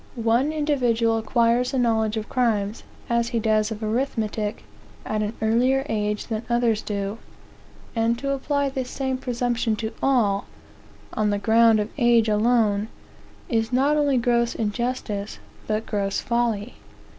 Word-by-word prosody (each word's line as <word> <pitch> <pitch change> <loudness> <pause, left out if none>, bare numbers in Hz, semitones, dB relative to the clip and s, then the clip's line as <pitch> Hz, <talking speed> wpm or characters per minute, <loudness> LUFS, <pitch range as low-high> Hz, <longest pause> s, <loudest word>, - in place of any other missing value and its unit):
One 235 +5 +1
individual 245 -7 +1
acquires 235 +3 +1
a - - +1
knowledge 220 -3 +1
of 215 - -4
crimes, 220 -4 0 0.3
as 235 0 +1
he 235 -1 -1
does 215 -1 +2
of 220 0 -6
arithmetic, 220 -2 -2 0.4
at 215 0 -1
an 210 +2 -3
earlier 250 +5 +2
age 210 -1 -1
than 220 -2 -3
others 235 -2 +2
do. 200 +1 -4 0.8
And 230 +1 +1
to 275 +3 -2
apply 280 +1 0
the 265 -1 -3
same 260 +1 -3
presumption 240 -3 -1
to 220 +1 -4
all, 220 -7 +2 0.7
on 215 -1 +1
the 205 - +1
ground 225 +1 +4
of 210 +1 -2
age 235 -2 +4
alone, 215 -1 +2 0.6
is 225 -1 0
not 275 +4 +3
only 290 -3 +2
gross 235 0 +1
injustice, 215 -2 -3 0.3
but 215 +1 -1
gross 200 -2 -1
folly. 235 -2 -1
230 Hz, 145 wpm, -24 LUFS, 215-245 Hz, 0.8 s, ground